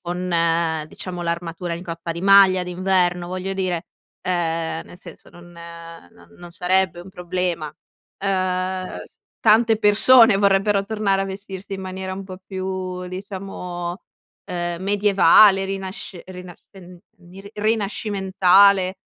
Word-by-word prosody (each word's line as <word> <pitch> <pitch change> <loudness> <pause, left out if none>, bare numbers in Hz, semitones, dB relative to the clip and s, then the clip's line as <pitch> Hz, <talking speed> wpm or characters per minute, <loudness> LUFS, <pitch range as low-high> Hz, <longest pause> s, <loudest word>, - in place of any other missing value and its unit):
con, 180 +1 -4
ehm, 165 -1 +1
diciamo 175 +2 -7
l'armatura 170 0 -4
in 170 - -8
coppa 170 -1 -5
di 170 - -7
maglia 195 -1 +6
d'inverno, 180 -1 0
voglio 185 +1 -4
dire 185 -3 -2 0.3
ehm, 165 -2 -2
nel 180 - -14
senso 170 -4 -13
non 175 0 -16
ehm, 170 - -11
no, 85 -1 -19
non 175 - -11
sarebbe 180 +1 0
un 180 - -12
problema. 180 -3 -3 0.6
Ehm, 185 -1 -2 0.4
tante 225 0 +4
persone, 225 +1 +6
vorrebbero 200 0 +2
tornare 200 -2 0
a - - -2
vestirsi 195 0 -8
in 190 - -7
maniera 190 0 -6
un 195 +1 -6
po' 185 -1 -10
più 185 -1 -5
diciamo, 185 -2 -6 0.4
ehm, 175 -1 -4
medievale, 200 0 +5
rinasc 195 0 -6
rina 180 -1 -10 0.2
rin 180 -2 -14 0.3
ri 195 +2 -12
rinascimentale, 200 -3 +2
185 Hz, 130 wpm, -21 LUFS, 175-195 Hz, 0.6 s, maglia